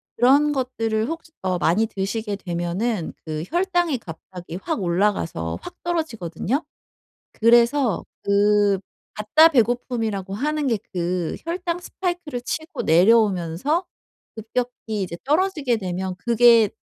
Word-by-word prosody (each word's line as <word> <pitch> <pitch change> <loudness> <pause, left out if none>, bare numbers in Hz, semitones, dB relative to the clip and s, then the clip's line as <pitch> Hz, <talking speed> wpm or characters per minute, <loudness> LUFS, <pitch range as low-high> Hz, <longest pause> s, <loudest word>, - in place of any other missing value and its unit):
그런 285 +5 +4
것들을 225 -4 -1
혹시 330 0 -6
어 185 -1 0
많이 185 +7 +2
드시게 205 0 -3
되면은 175 +3 -2
그 155 -1 -4
혈당이 350 -4 +1
갑자기 175 -3 -9
확 320 - -2
올라가서 170 - 0
확 - - -9
떨어지거든요. 270 - -2 0.8
그래서 235 0 +4 0.2
그 205 0 +3 0.4
가짜 305 +10 +5
배고픔이라고 225 - 0
하는 300 +5 -1
게 230 -5 +1
그 175 -1 -2
혈당 345 0 -2
스파이크를 350 -7 -4
치고 315 +6 -4
내려오면서 195 - +3 0.5
급격히 225 -2 -3
이제 170 -2 -4
떨어지게 300 -5 +1
되면 185 -1 -3
그게 235 -2 +5
225 Hz, 280 characters per minute, -23 LUFS, 190-285 Hz, 0.8 s, 가짜